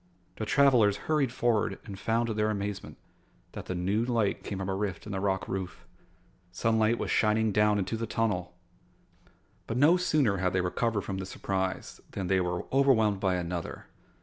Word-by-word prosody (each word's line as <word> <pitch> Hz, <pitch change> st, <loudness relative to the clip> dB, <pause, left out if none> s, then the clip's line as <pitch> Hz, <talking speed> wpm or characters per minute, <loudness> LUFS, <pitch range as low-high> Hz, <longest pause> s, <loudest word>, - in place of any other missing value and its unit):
The -, -, -4 dB
travelers 125 Hz, -8 st, +4 dB
hurried 150 Hz, -5 st, +1 dB
forward 115 Hz, -6 st, 0 dB
and 100 Hz, -3 st, -8 dB
found 115 Hz, +3 st, +1 dB
to 115 Hz, -, -2 dB
their 105 Hz, 0 st, +1 dB
amazement 100 Hz, -1 st, -4 dB, 0.5 s
that -, -, -8 dB
the 90 Hz, -, -3 dB
new 95 Hz, +6 st, 0 dB
light 115 Hz, -4 st, 0 dB
came 100 Hz, -, -5 dB
from 95 Hz, 0 st, -4 dB
a 95 Hz, -, -1 dB
rift 95 Hz, -2 st, -3 dB
in 105 Hz, -, -7 dB
the 95 Hz, -, -2 dB
rock 95 Hz, -1 st, -1 dB
roof. 95 Hz, -2 st, -5 dB, 0.7 s
Sunlight 110 Hz, +3 st, +2 dB
was -, -, -3 dB
shining 110 Hz, 0 st, +2 dB
down 105 Hz, 0 st, +3 dB
into 100 Hz, +3 st, -2 dB
the 115 Hz, 0 st, -3 dB
tunnel! 90 Hz, -6 st, -1 dB, 1.1 s
But 115 Hz, -, -2 dB
no 155 Hz, +7 st, +5 dB
sooner 150 Hz, -, +2 dB
had 90 Hz, -1 st, 0 dB
they 95 Hz, -, +2 dB
recovered 105 Hz, +4 st, 0 dB
from 95 Hz, -1 st, -4 dB
this 95 Hz, -, -6 dB
surprise 95 Hz, -1 st, -3 dB
than 95 Hz, -, -3 dB
they 95 Hz, +1 st, +2 dB
were 90 Hz, 0 st, -2 dB
overwhelmed 115 Hz, -7 st, +3 dB
by 95 Hz, -2 st, +1 dB
another. 90 Hz, -1 st, -4 dB
105 Hz, 180 wpm, -29 LUFS, 95-115 Hz, 1.1 s, no